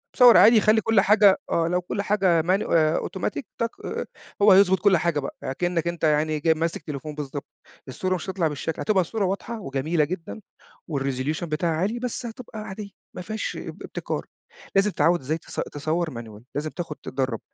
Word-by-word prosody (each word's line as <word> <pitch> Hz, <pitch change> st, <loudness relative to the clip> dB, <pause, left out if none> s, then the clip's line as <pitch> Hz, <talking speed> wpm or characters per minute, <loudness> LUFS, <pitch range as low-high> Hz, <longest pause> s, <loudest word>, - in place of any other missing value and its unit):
مصوّر 245 Hz, -2 st, +8 dB
عادي 220 Hz, 0 st, +7 dB
خلّي 220 Hz, +1 st, +4 dB
كلّ 225 Hz, -3 st, +3 dB
حاجة، 205 Hz, -1 st, +5 dB
آه 165 Hz, 0 st, +2 dB
لو 180 Hz, +1 st, 0 dB
كلّ 200 Hz, +3 st, -3 dB
حاجة 195 Hz, -5 st, +2 dB
ماني 185 Hz, +5 st, +1 dB
آآ 155 Hz, -1 st, +3 dB
أوتوماتيك 155 Hz, -6 st, -3 dB, 0.2 s
تك 230 Hz, 0 st, +1 dB, 0.7 s
هو 205 Hz, 0 st, +7 dB
هيضبط 190 Hz, -1 st, +6 dB
كلّ 195 Hz, -1 st, +4 dB
حاجة 165 Hz, -2 st, 0 dB
بقى، 140 Hz, -, -6 dB
يعني 130 Hz, -, -3 dB
كإنك 175 Hz, -1 st, 0 dB
أنت 170 Hz, -1 st, -4 dB
يعني 155 Hz, 0 st, +2 dB
جاي 160 Hz, +2 st, +3 dB
ماسك 165 Hz, +3 st, -2 dB
تليفون 150 Hz, 0 st, -6 dB
بالضبط، 145 Hz, -1 st, -5 dB, 0.4 s
الصورة 185 Hz, +8 st, -1 dB
مش 180 Hz, +2 st, -6 dB
هتطلع 185 Hz, -4 st, 0 dB
بالشكل 150 Hz, +1 st, -4 dB
هتبقى 200 Hz, -3 st, +2 dB
الصورة 200 Hz, +4 st, -1 dB
واضحة 215 Hz, +5 st, -3 dB
وجميلة 150 Hz, 0 st, 0 dB
جدًا 175 Hz, +6 st, -6 dB, 0.5 s
والresolution 140 Hz, +3 st, -2 dB
بتاعها 160 Hz, +1 st, -1 dB
عالي، 200 Hz, +9 st, -1 dB
بس 250 Hz, 0 st, -4 dB
هتبقى 225 Hz, -1 st, -8 dB
عادية 205 Hz, 0 st, -7 dB, 0.3 s
ما -, -, -5 dB
فيهاش 215 Hz, +4 st, -4 dB, 0.2 s
ابتكار، -, -, -4 dB, 0.5 s
لازم 195 Hz, +1 st, +4 dB
تتعوّد 175 Hz, -1 st, +3 dB
إزاي 155 Hz, +5 st, -2 dB
تص -, -, -9 dB
تصوّر 155 Hz, +3 st, -2 dB
manual 115 Hz, -2 st, -9 dB
لازم 150 Hz, +2 st, -2 dB
تاخد 165 Hz, -2 st, -6 dB
تدرّب، 130 Hz, -4 st, -2 dB
170 Hz, 180 wpm, -24 LUFS, 155-200 Hz, 0.7 s, مصوّر